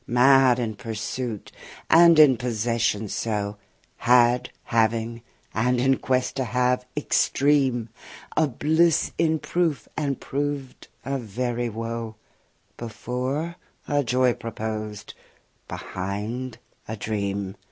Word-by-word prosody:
Mad 130 0 +5
in 115 -3 -2
pursuit 115 0 -5 0.4
and 170 0 +7
in 150 -4 +8
possession 115 -2 -1
so; 105 -1 -2 0.4
Had, 120 0 +4
having, 115 0 0 0.3
and 125 +2 +1
in 130 +1 +3
quest 130 0 0
to 130 - +1
have 125 +1 0
extreme; 135 -5 +2 0.5
A 160 - +3
bliss 160 +5 +2
in 160 -1 +3
proof, 165 -2 -1
and 140 -3 -2
proved, 140 -1 -4 0.2
a 135 0 -1
very 120 +2 -2
woe; 115 0 -5 0.6
Before, 130 +8 -4 0.3
a 145 -1 +1
joy 125 0 +2
proposed; 110 -2 -5 0.5
behind 105 +7 -5 0.3
a 110 - -5
dream. 100 -2 -3
125 Hz, 105 wpm, -24 LUFS, 110-135 Hz, 0.6 s, in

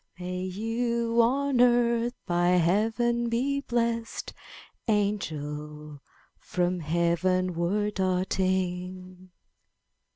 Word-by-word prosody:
May 180 0 -4
you 230 +4 0
on 265 +2 +2
earth 240 0 +3
by 175 0 +1
Heaven 225 +7 +2
be 270 +4 0
blessed. 235 -2 -2 0.5
Angel, 150 -8 -2 0.4
from 180 0 -1
Heavenward 175 +4 0
darting!' 185 -1 -1
190 Hz, 70 wpm, -27 LUFS, 180-235 Hz, 0.5 s, earth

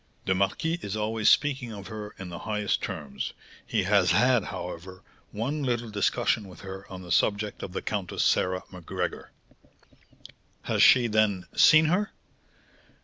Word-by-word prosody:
"The 95 - +2
marquis 100 - 0
is 100 - -4
always 110 0 +1
speaking 135 -5 +2
of 100 -2 -8
her 105 -1 -8
in 95 -2 -7
the 85 0 -7
highest 105 -1 -1
terms; 70 -2 -5 0.3
he - - 0
has 95 -1 +3
had, 120 +5 +3
however, 90 +1 -7 0.3
one 135 +8 -3
little 120 -4 -2
discussion 105 0 0
with 90 -3 -13
her 95 0 -9
on 95 -1 -8
the 90 - -9
subject 105 +1 +1
of - - -6
the - - -4
Countess 100 -4 -2
Sarah 90 0 +1
Macgregor." 90 -3 -5 1.3
"Has - - 0
she, 125 -2 +7
then, 105 -5 +1
seen 155 0 +7
her?" 185 +7 +1
105 Hz, 150 wpm, -27 LUFS, 95-115 Hz, 1.3 s, she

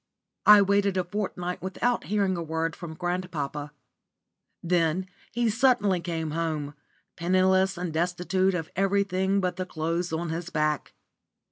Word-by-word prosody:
I 210 -1 +9
waited 200 -1 +2
a 185 - +2
fortnight 180 -2 -4
without 210 +6 -1
hearing 200 -2 +1
a 170 - -3
word 160 0 -2
from 165 -3 -8
grandpapa. 165 -5 -3 0.9
Then 170 +1 +1 0.3
he 240 0 0
suddenly 225 -5 +3
came 165 -2 -3
home, 155 -3 -2 0.4
penniless 185 +2 +2
and 175 -2 -3
destitute 180 +3 +1
of 165 -3 -4
everything 195 0 +1
but 180 -1 -1
the 185 - -2
clothes 165 +1 -2
on 165 +1 -2
his 170 +1 -4
back. 155 -2 -1
180 Hz, 135 wpm, -27 LUFS, 165-190 Hz, 0.9 s, I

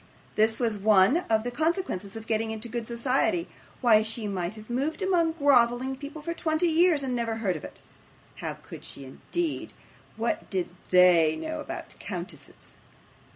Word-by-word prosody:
This 220 +1 +2
was 225 -4 0
one 205 - +5
of 220 -1 +3
the 245 - -3
consequences 310 - -1
of 220 0 -7
getting 225 0 0
into 220 +1 -4
good 235 -1 -4
society. 265 +8 +1 0.3
Why, 225 -4 +6
she 220 0 -3
might 185 0 -3
have 215 0 -11
moved 280 +10 -2
among 345 -4 +2
grovelling 260 -3 +3
people 290 +3 -8
for 335 - -2
twenty 315 0 0
years, 330 -2 +4
and 255 -2 -1
never 230 -2 -1
heard 205 -5 -1
of 155 - -7
it. - - -10 0.6
How - - -4
could - - -12
she, 140 - -8
indeed? 325 - -4 0.4
what 230 +1 -2
did 185 -3 -1 0.2
THEY 175 -4 +6
know 315 - -4
about - - -6
countesses? - - -8
235 Hz, 165 wpm, -27 LUFS, 215-310 Hz, 0.6 s, Why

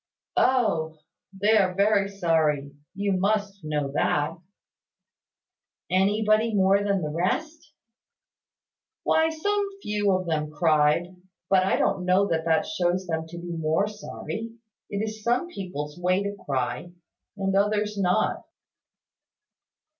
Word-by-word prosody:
"Oh! 165 -12 +2 0.3
They 205 +3 +2
are 185 -3 +2
very 200 0 +3
sorry; 160 -7 +1 0.2
you 200 0 0
must 200 0 0
know 150 -2 -2
that." 150 +1 +1 1.6
"Anybody 215 +3 +2
more 195 +1 +4
than 200 -3 0
the 150 - -2
rest?" 300 - -2 1.3
"Why 320 0 +3
some 405 +5 -1
few 205 -1 +1
of 185 0 0
them 155 -2 -1
cried; 155 +3 +2 0.4
but 190 -1 +4
I - - +3
don't 180 - 0
know 185 +2 +3
that 160 0 0
that 160 -1 +2
shows 180 +1 0
them 160 -2 -3
to 170 +1 -9
be 175 0 -6
more 160 +4 0
sorry. 215 +2 -6 0.4
It 205 +2 -2
is 215 0 -7
some 245 +10 +1
people's 175 - -6
way 185 +2 +1
to 200 0 -3
cry 130 +4 -2 0.5
and 195 -1 -1
others 210 +1 +1
not." 195 +1 +1
190 Hz, 125 wpm, -26 LUFS, 165-210 Hz, 1.6 s, more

